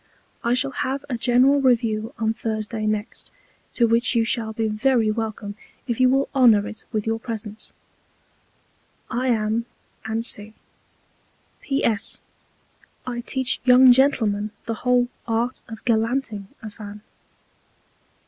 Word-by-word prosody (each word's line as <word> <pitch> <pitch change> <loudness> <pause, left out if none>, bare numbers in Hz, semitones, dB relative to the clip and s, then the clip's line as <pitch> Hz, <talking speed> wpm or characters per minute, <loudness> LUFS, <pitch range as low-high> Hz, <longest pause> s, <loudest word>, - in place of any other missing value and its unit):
I 235 +1 +2
shall 270 +2 +1
have 270 +2 -3
a - - 0
general 255 +4 +3
Review 225 -3 +1
on 220 0 0
Thursday 215 -1 -3
next; 215 0 -3 0.5
to 235 - +4
which 230 +2 +2
you 230 -1 +3
shall 225 -2 0
be 220 0 -1
very 220 +1 +2
welcome 215 -2 -4 0.3
if 235 -2 -3
you 255 0 +5
will 270 +1 +2
honour 230 -6 +5
it 215 - -9
with 215 -2 -2
your 225 0 -1
Presence. 220 -2 -7 1.4
I 250 +3 -1
am, 225 0 0 0.5
&c. 215 -2 0 1.1
P.S. 230 -7 +1 0.9
I 245 -1 -4
teach 260 +1 -1
young 255 0 +7
Gentlemen 225 -6 +2 0.2
the 230 - -2
whole 250 -1 +3 0.2
Art 235 +2 -1
of 225 -1 -10
Gallanting 225 -3 0 0.2
a 215 - -7
Fan. 205 0 -10
230 Hz, 130 wpm, -23 LUFS, 215-250 Hz, 1.4 s, young